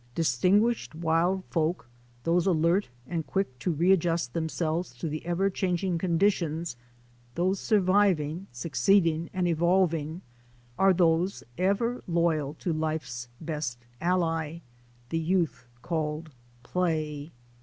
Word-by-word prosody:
Distinguished 180 - +2
wild 170 +3 +1
folk, 160 -5 -1 0.4
those 170 +2 +2
alert 170 +1 +2 0.2
and 165 +2 -2
quick 190 -11 -2
to - - -1
re 170 +3 +3
adjust 165 -8 +1
themselves 160 -1 -2
to 125 - -4
the 155 0 -4
ever 175 +3 +1
changing 180 -1 0
conditions 170 -4 +1 0.3
— 120 0 -31
those 185 +2 +1
surviving, 190 -4 +2
succeeding 160 +6 +2
and 185 -1 0
evolving— 170 -1 +1 0.5
are 195 +6 +5
those 175 +1 +2
ever 200 +7 0
loyal 165 -4 +1
to 170 +1 -2
life's 150 -7 -3
best 150 -7 -4 0.2
ally 165 -2 0 0.2
— 120 0 -31
the 165 - +1
youth 165 -6 0 0.2
called 155 -1 -2 0.3
Play. 155 -2 -1
165 Hz, 120 wpm, -28 LUFS, 155-180 Hz, 0.5 s, are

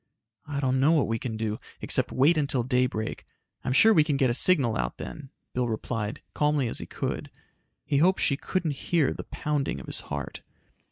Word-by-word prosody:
"I 145 -1 -3
don't 130 -1 +1
know 145 +5 +4
what 155 -4 +3
we 115 0 -1
can 110 -2 -4
do, 110 -1 -2 0.2
except - - 0
wait 145 +6 +4
until 140 -5 +1
daybreak. 125 -3 -1 0.4
I'm 125 - -1
sure 220 +12 +6
we 155 - +6
can 150 -2 0
get 130 -3 +3
a - - +1
signal 135 -5 +3
out - - -2
then," 140 -3 -8 0.2
Bill 125 -1 0
replied, 110 -1 -3
calmly 150 -3 +1
as - - -1
he - - -7
could. - - -4 0.6
He 140 - +1
hoped 185 +6 +4
she 140 - +2
couldn't 170 +2 -2 0.2
hear 160 -6 +3
the - - -7
pounding 145 - -2
of 65 - -9
his - - +1
heart. 70 -1 -5
135 Hz, 200 wpm, -27 LUFS, 115-150 Hz, 0.6 s, sure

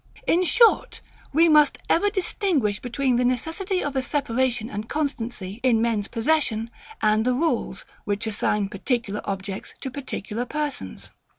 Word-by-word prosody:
In 355 +2 +3
short, 455 +7 +4 0.3
we 325 +4 +5
must 300 -2 +5
ever 410 +5 +3
distinguish 355 - 0
between 255 0 0
the 250 - +2
necessity 325 - -1
of 285 -1 -3
a 265 - +2
separation 255 -4 0
and 210 -1 -6
constancy 235 -9 -3
in 245 -4 +3
men's 225 -3 0
possession, 230 -3 0 0.3
and 215 +1 +3
the 250 +1 +1
rules, 255 - -1 0.2
which 205 +2 -2
assign 210 -1 0
particular 210 0 -2
objects 195 0 -5
to 265 - -4
particular 245 -4 -4
persons. 290 - -5
245 Hz, 140 wpm, -24 LUFS, 215-300 Hz, 0.3 s, we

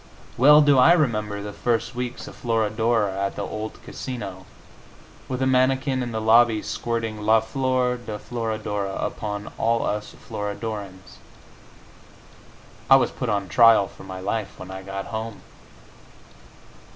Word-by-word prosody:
Well 150 +4 +7
do 145 -3 +5
I 160 +7 +7
remember 105 -10 0
the 105 0 -6
first 115 +3 -1
weeks 125 0 -5
of - - -10
"Florodora" 110 -2 0
at 100 - -2
the - - -3
old 110 0 -6
Casino, 95 -8 -7 0.8
with 130 0 -2
a - - +2
mannikin 130 +1 +2
in 120 -1 -3
the 110 - -2
lobby 110 0 +4
squirting 115 -2 -3
"La 110 +1 +4
Flor 125 +1 0
de 110 -3 -6
Florodora" 110 -4 -3
upon 105 -1 -4
all 115 0 +1
us 105 0 -3
Florodorans.... 100 -3 -6 1.7
I 135 - +9
was 135 - +3
put 125 - -4
on 100 -2 -1
trial 115 -2 +6
for - - -14
my 95 -1 -7
life 100 +2 -3
when 95 0 -9
I 95 0 -7
got 95 0 -6
home! 110 -1 -6
110 Hz, 140 wpm, -24 LUFS, 105-125 Hz, 1.7 s, I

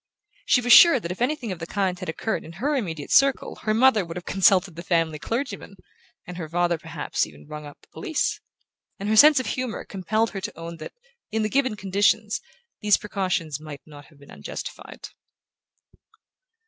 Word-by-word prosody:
She 250 - +4
was 245 0 +5
sure 335 -7 +9
that 170 -5 -5
if 185 - -7
anything 250 -4 -1
of 180 - -6
the 165 - -6
kind 190 -2 -1
had 185 -4 -6
occurred 220 +7 -3
in 165 - -11
her 275 - -1
immediate 165 - -4
circle 275 -1 +3
her 215 - -1
mother 235 -3 +4
would 170 0 -7
have 180 - -7
consulted 190 -2 +3
the 170 - -7
family 165 -3 0
clergyman, 225 - -4 0.5
and 180 0 -8
her 160 -3 -6
father 175 0 0
perhaps - - -3
even 75 0 -15
have 75 - -18
rung 150 -1 -7
up 145 - -14
the - - -22
police; 330 -7 -2 0.6
and 200 - -5
her 220 - +2
sense 295 +4 +8
of 255 - -3
humour 250 +2 -4
compelled 215 +4 -1
her 195 - -6
to 210 +2 -6
own 165 0 -7
that, 155 - -9 0.4
in 220 0 -1
the 215 - -1
given 260 -2 +1
conditions, 205 +2 +1 0.4
these 210 -1 +4
precautions 185 -7 -2
might 150 -2 -9
not 145 -2 -13
have 150 - -22
been 140 0 -17
unjustified. - - -8
195 Hz, 195 wpm, -24 LUFS, 165-225 Hz, 0.6 s, sure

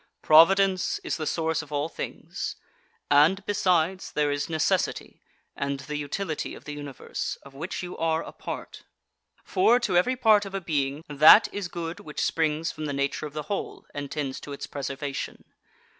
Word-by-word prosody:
Providence 185 +4 +5
is - - -2
the 155 -2 -3
source 160 -1 0
of 155 -2 -13
all 145 +1 0
things; 165 - -5 0.6
and, 165 +8 +5
besides, 185 -2 +1
there 150 -1 +1
is 145 +1 -2
necessity, 160 -2 -1 0.3
and 140 0 -2
the 150 +2 -6
utility 155 +3 -3
of - - -14
the 150 - -5
Universe, 145 -3 -5
of 140 - -14
which 170 +7 -5
you 180 0 -6
are 165 0 +1
a - - -9
part. - - -7 0.6
For, 245 -10 +4
to 200 -6 0
every 250 +9 +3
part 220 -4 +5
of 195 -1 -7
a - - 0
being, 145 -3 -1
that 155 +9 +8
is 205 -3 -3
good 170 -1 -5
which 150 - -3
springs 160 0 0
from 155 - -6
the 145 - -2
nature 140 +2 -1
of 145 - -13
the 150 0 -4
whole 200 +6 -4
and 145 -1 -5
tends 140 -3 -3
to 145 - -8
its 140 - -6
preservation. 140 0 -5
155 Hz, 175 wpm, -26 LUFS, 145-180 Hz, 0.6 s, that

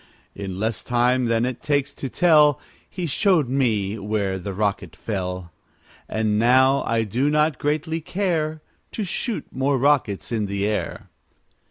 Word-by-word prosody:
In 95 -2 -6
less 110 0 -1
time 125 +1 +1
than 115 0 +2
it 125 -1 -4
takes 145 -1 0
to 135 - -5
tell, 150 -4 +4 0.3
He 180 - -4
showed 165 - +2
me 110 -6 0
where 100 -2 -1
that 95 +2 -5
rocket 100 -5 -2
fell; 90 -3 -4 0.6
And 110 -1 0
now 130 +4 +4
I 115 -1 +1
do 120 +7 0
not 150 -1 +2
greatly 155 +2 -1
care 160 -4 -2 0.3
To 215 - -2
shoot 210 +4 -3
more 135 +1 +1
rockets 130 -8 +1
in 110 -3 -1
the 100 0 -2
air. 105 0 -3
125 Hz, 150 wpm, -23 LUFS, 105-150 Hz, 0.6 s, tell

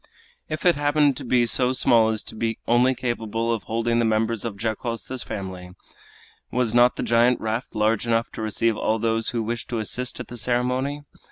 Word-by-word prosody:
If 155 +2 -4
it 175 -2 +5
happened 145 -1 +2
to - - -6
be 120 0 +2
so 125 +2 +3
small 115 -3 +4
as 110 -1 -2
to - - -7
be 115 0 -2
only 125 +2 +3
capable 115 -1 -2
of 115 - -3
holding 115 +1 0
the - - +2
members 110 0 0
of 115 -4 -5
Dacosta's 115 +3 -4
family, 90 -2 -7 0.7
was 125 -3 0
not 120 +1 +5
the - - -3
giant 120 +2 +3
raft 110 +3 -3
large 110 +2 +1
enough 115 0 +1
to - - -7
receive 110 +1 0
all 110 +1 0
those 115 0 0
who 115 -2 -2
wished 115 +1 -4
to 120 - -2
assist 125 +4 -3
at 125 - -6
the 120 - -7
ceremony? 125 +4 -1
115 Hz, 195 wpm, -24 LUFS, 110-125 Hz, 0.7 s, it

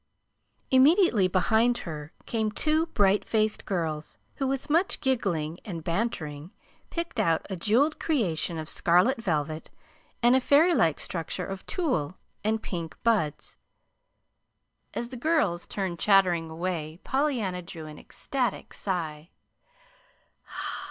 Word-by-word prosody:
Immediately 265 - +5
behind 220 +6 +3
her 150 -2 -6
came 220 -2 0
two 310 +8 +1
bright 205 -8 +3
faced 215 -1 0
girls 160 -5 -3 0.2
who, 270 - 0
with 270 0 -2
much 335 +5 +2
giggling 175 - 0
and 170 -6 -6
bantering, 165 -6 -2 0.4
picked 335 0 -3
out 165 -1 +2
a - - -1
jeweled 240 - +2
creation 180 - 0
of 155 -1 -5
scarlet 180 +11 +3
velvet, 155 -5 -2 0.5
and 240 +2 +6
a - - +5
fairy 295 +7 +5
like 165 - +2
structure 175 +1 -4
of 195 0 -7
tulle 185 - -1 0.3
and 220 +1 0
pink 170 -3 -5
buds. 205 -11 0 1.4
As 235 - -3
the 255 - -7
girls 240 - +1
turned 185 -4 -3
chattering 180 -5 +4
away 165 -1 -4
Pollyanna 245 -10 0
drew 165 -2 -9
an 150 -1 -10
ecstatic 250 -6 -3
sigh. 165 -4 -3
195 Hz, 125 wpm, -27 LUFS, 165-250 Hz, 1.4 s, and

